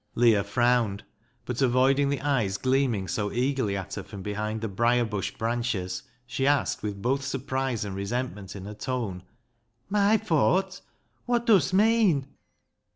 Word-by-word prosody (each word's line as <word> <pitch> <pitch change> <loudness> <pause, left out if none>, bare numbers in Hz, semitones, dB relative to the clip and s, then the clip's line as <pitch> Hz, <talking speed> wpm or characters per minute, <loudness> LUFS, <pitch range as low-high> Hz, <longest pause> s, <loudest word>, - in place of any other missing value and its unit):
Leah 115 -4 +4
frowned, 120 -5 +1 0.4
but 125 +1 -3
avoiding 135 +2 +3
the 140 -1 -1
eyes 120 -9 0
gleam 130 0 +2
ing 95 -2 -4
so 105 +1 -2
eagerly 125 -5 0
at 95 - -6
her 100 - -4
from 95 0 -9
behind 105 +2 -3
the 115 - -2
briar 120 +4 +2
bush 105 -4 -2
branches, 115 -6 -2 0.2
she 130 +2 -1
asked, 145 -1 +1
with 100 -2 -5
both 135 +3 +1
surprise 130 -4 -2
and 100 -2 -5
resentment 105 -1 -4
in 95 -1 -7
her 105 - -6
tone 110 -5 -3 0.3
— 120 -1 -46
" 120 +6 -44
My 205 +2 +5
fawt? 190 0 +1 0.5
Wot 240 -1 +1
dust 190 -5 +4
meean 205 -9 +4
120 Hz, 160 wpm, -27 LUFS, 105-140 Hz, 0.5 s, My